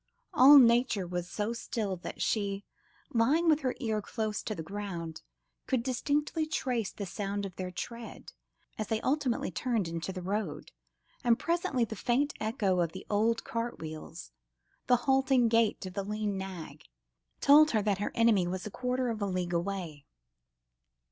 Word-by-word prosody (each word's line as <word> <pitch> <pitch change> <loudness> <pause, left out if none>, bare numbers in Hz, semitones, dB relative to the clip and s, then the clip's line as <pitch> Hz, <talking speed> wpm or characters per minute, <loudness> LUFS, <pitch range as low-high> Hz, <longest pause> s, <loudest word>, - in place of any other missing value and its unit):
All 280 +3 +9
nature 235 -5 +5
was 175 0 -4
so 210 +4 -2
still 215 -4 -3
that 175 - -5
she, 200 -2 -1 0.5
lying 280 +9 +3
with 310 -2 +5
her 255 -4 -1
ear 220 -4 -1
close 215 0 -3
to 215 - -4
the 160 - -5
ground, 175 -4 -5 0.5
could 255 -3 +1
distinctly 295 +5 0
trace 250 -8 -1
the 200 - -6
sound 200 +2 -3
of 185 -3 -8
their 185 -1 -4
tread, 230 +5 -8 0.5
as 215 - -2
they 220 - 0
ultimately 265 -3 0
turned 230 -8 -1
into 165 +2 -4
the 185 -1 -6
road, 195 -4 -3 0.5
and 235 -1 +4
presently 335 -8 0
the 220 - -7
faint 255 +7 +1
echo 215 -4 0
of 170 -2 0
the 190 - -8
old 225 +3 +2
cart 230 +1 -3
wheels, 160 +1 -8 0.6
the 250 - +6
halting 265 -3 +3
gait 225 -3 +2
of 185 - -7
the 200 - -2
lean 210 0 -2
nag, 180 -6 -7 0.5
told 300 +2 +7
her 220 -6 +2
that 200 -2 +1
her 205 - -2
enemy 225 -6 +4
was 185 +1 -4
a 210 - -5
quarter 250 +1 -1
of 220 -2 -5
a 200 - 0
league 180 -2 -2
away. 170 -5 -3
215 Hz, 170 wpm, -30 LUFS, 190-245 Hz, 0.6 s, All